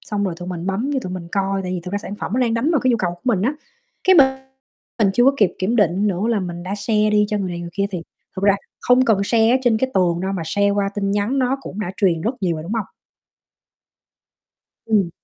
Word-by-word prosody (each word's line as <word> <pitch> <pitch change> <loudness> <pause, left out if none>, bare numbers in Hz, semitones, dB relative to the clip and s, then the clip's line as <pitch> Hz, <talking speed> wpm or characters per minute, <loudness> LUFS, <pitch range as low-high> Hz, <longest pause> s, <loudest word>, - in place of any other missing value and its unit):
xong 205 -1 -3
rồi 185 -3 -2
tụi 175 +1 -7
mình 175 -1 -5
bấm 205 +8 -1
vô - - +1
tụi 185 - -5
mình 175 -2 -6
coi, 195 0 0
tại 180 - -4
vì 180 - -3
thực 180 - -7
ra 205 - 0
sản 205 0 -7
phẩm 210 - -6
nó 255 - +1
đang 235 -2 +1
đánh 235 +7 +1
vào 310 -5 +2
cái 255 - +2
nhu 235 - +3
cầu 180 -5 -1
của 175 - -23
mình 225 -7 +1
á, 260 +7 +1 0.5
cái 375 0 +6
mình 280 -4 +8 0.7
mình 205 -4 +3
chưa 245 - +4
có 270 - +6
kịp 205 -8 +2
kiểm 205 +6 0
định 200 -1 +2
nữa 190 -2 -1
là 225 -3 +1
mình 175 -2 -5
đã 185 +2 -4
share 210 +1 +1
đi 210 0 +4
cho 210 - -1
người 195 -2 -2
này 175 0 -5
người 170 0 -7
kia 200 +3 0
thì 180 -4 -4 0.3
thực 190 - -5
ra 200 -1 +5 0.3
không 250 +1 +4
cần 215 -5 +2
share 225 +1 +3
ở 250 - +5
trên 240 -3 +3
cái 260 +3 0
tường 175 -2 +2
đâu 190 +1 -2
mà 185 -4 -3
share 200 +5 +1
qua 200 0 0
tin 200 -1 -1
nhắn 205 +7 0
nó 260 +1 +1
cũng 210 -5 -7
đã 185 -4 -3
truyền 180 -6 +2
rất 225 +8 -1
nhiều 175 -4 0
rồi, 155 - -6
đúng 175 +6 -6
hông? 225 -3 -1 2.0
Ừm, 205 -6 +2
200 Hz, 275 wpm, -20 LUFS, 185-230 Hz, 2.0 s, mình